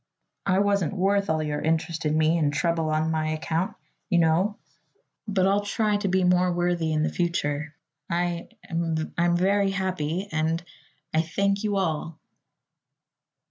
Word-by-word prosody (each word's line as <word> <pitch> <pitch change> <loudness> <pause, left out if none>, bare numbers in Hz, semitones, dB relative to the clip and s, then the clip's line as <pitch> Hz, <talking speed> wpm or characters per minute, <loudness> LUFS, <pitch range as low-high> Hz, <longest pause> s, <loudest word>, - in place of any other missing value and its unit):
I 190 -1 +3
wasn't 200 -3 +1
worth 200 +1 +1
all 155 0 +1
your 150 -1 -2
interest 160 0 0
in 150 +1 +1
me 160 +2 +3
and 145 -2 +2
trouble 165 +1 0
on 155 +1 +1
my 155 -1 0
account, 160 +3 -2 0.3
you 180 - +3
know; 170 +5 +2 0.7
but 195 -3 +2
I'll 200 +1 +3
try 210 +1 +1
to 205 -1 -2
be 190 0 +2
more 180 0 +3
worthy 175 -2 0
in 155 0 +1
the - - 0
future. 150 -4 -1 0.3
I 175 0 -1 0.2
I'm 170 +1 0
very 195 +2 +2
happy 185 -2 -2
and 160 +1 0 0.5
I 160 - +3
I - - +5
thank 200 +5 0
you 210 -1 0
all!" 160 -3 -2
170 Hz, 155 wpm, -26 LUFS, 160-195 Hz, 0.7 s, I